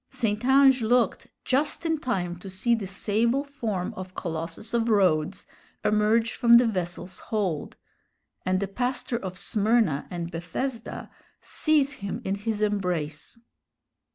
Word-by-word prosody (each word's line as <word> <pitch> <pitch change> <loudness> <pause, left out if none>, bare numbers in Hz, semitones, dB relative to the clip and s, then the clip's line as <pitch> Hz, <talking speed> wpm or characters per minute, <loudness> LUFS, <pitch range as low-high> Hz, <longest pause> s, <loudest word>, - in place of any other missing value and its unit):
St. 225 -4 -1
Ange 265 0 +5
looked 240 +2 +2 0.2
just 295 +5 0
in 320 -2 +1
time 180 -10 -2
to 195 - -9
see 215 +6 +1
the 220 -4 -1
sable 225 +7 0
form 230 -10 -3
of 185 0 -8
Colossus 165 +5 -4
of 235 0 +1
Rhodes 185 -4 +2 0.4
emerge 215 +2 +3
from 235 -2 +6
the 245 - +5
vessel's 180 -3 -3
hold, 190 -9 -2 0.7
and 185 0 +1
the 200 - -1
pastor 245 +3 -2
of 185 -5 -6
Smyrna 210 -8 +2
and 170 -1 -5
Bethesda 225 +9 -5 0.3
seize 295 -3 +1
him 200 -1 -3
in 190 - 0
his 210 +1 -2
embrace. 180 -5 -2
210 Hz, 135 wpm, -26 LUFS, 185-240 Hz, 0.7 s, from